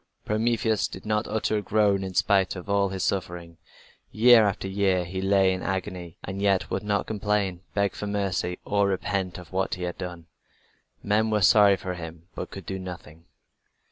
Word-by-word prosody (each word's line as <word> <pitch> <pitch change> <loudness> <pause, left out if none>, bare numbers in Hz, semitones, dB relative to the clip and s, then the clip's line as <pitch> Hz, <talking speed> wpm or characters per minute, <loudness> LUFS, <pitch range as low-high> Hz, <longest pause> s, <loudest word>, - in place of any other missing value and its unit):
But - - -18
Prometheus 110 0 +1
did - - -10
not 105 0 0
utter 110 0 0
a - - -4
groan 100 -1 +2
in 95 -1 -6
spite 95 -3 +2
of 90 - -8
all 100 -1 +2
his 95 -1 -3
sufferings. 85 -3 -3 0.5
Year 115 -1 +6
after 95 -1 -2
year 95 -2 +1
he 95 +2 -4
lay 95 -1 +3
in 95 - -4
agony, 90 -3 -4
and 95 +1 -5
yet 100 -2 +3
he - - -16
would 95 - -1
not 105 -1 -1
complain, 105 -4 -1
beg 100 -1 +1
for 105 - -5
mercy 95 -3 -1
or 100 -1 +2
repent 95 -1 -2
of 90 +1 -12
what 95 0 0
he 90 - -6
had 90 -1 -4
done. 90 -3 -6 0.8
Men 110 +2 +2
were 105 -2 +1
sorry 100 0 +6
for 90 0 -5
him, 80 -2 -8
but - - -6
could 95 -3 -9
do 95 +2 -4
nothing. 85 -3 -9
95 Hz, 195 wpm, -26 LUFS, 90-105 Hz, 0.8 s, Year